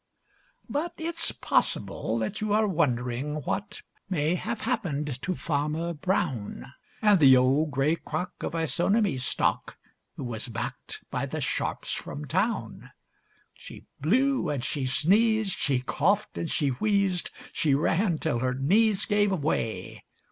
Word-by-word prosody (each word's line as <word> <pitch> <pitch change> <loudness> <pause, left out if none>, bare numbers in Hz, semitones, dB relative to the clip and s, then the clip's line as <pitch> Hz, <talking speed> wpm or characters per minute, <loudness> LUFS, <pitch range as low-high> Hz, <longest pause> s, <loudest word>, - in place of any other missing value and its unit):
But 310 +5 -2
it's 330 0 0
possible 110 - 0
that 110 - -3
you 215 -1 0
are 215 +1 +4
wondering 135 -4 0
what 205 - -3 0.3
May 160 -3 +1
have 215 +5 -3
happened 145 -5 -2
to 185 - -2
Farmer 155 +2 -1
Brown, 145 - -2 0.3
And 205 -3 +6
the 135 -4 +8
old 135 +5 +3
gray 145 +4 +1
crock 180 - -4
of - - -3
Isonomy 175 - +1
stock 125 - -1 0.4
Who - - -6
was 115 -1 -3
backed 115 - -6
by - - -2
the - - -4
sharps - - -2
from 145 +1 -5
town. 185 - -2 0.6
She - - -12
blew 260 - +2
and 135 -3 -2
she 135 -3 -1
sneezed, 210 - +3
she 135 -4 +1
coughed 190 +10 0
and 165 - -3
she 145 -3 +1
wheezed, 195 - +1 0.2
She 145 -4 +2
ran 170 +4 +1
till 150 -6 -1
her 130 0 0
knees 200 - +3
gave 205 -1 +2
way. 125 - -2
160 Hz, 140 wpm, -27 LUFS, 135-205 Hz, 0.6 s, the